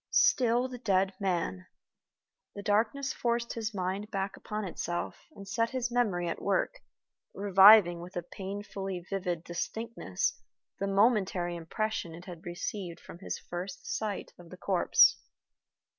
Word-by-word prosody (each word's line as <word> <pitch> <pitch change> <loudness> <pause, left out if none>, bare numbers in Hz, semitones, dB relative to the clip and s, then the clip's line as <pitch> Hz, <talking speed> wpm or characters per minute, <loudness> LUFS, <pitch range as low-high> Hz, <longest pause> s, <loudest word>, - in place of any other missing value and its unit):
Still 245 0 +4
the 250 -1 -8
dead 195 -4 +2
man! 185 -1 -1 0.9
The 200 - -6
darkness 225 +7 +1
forced 235 0 -1
his 225 -1 -3
mind 195 +1 -3
back 195 -2 -2
upon 215 0 -5
itself, 175 -1 -4
and 200 -1 -10
set 230 +4 0
his 250 -2 -2
memory 205 -8 +1
at 165 - -3
work, 200 - 0 0.6
reviving 195 -2 +7
with 180 +3 -10
a 175 - -2
painfully 195 0 -5
vivid 180 -4 -2
distinctness 175 - -3 0.4
the 200 - -1
momentary 195 -4 +2
impression 170 0 -3
it 175 +2 -11
had 175 -2 -9
received 175 0 -4
from 170 - -12
his 195 - -4
first 180 +1 -7
sight 210 -3 -3
of 175 -1 -13
the 185 - -10
corpse. 185 -1 +5
195 Hz, 140 wpm, -30 LUFS, 175-220 Hz, 0.9 s, reviving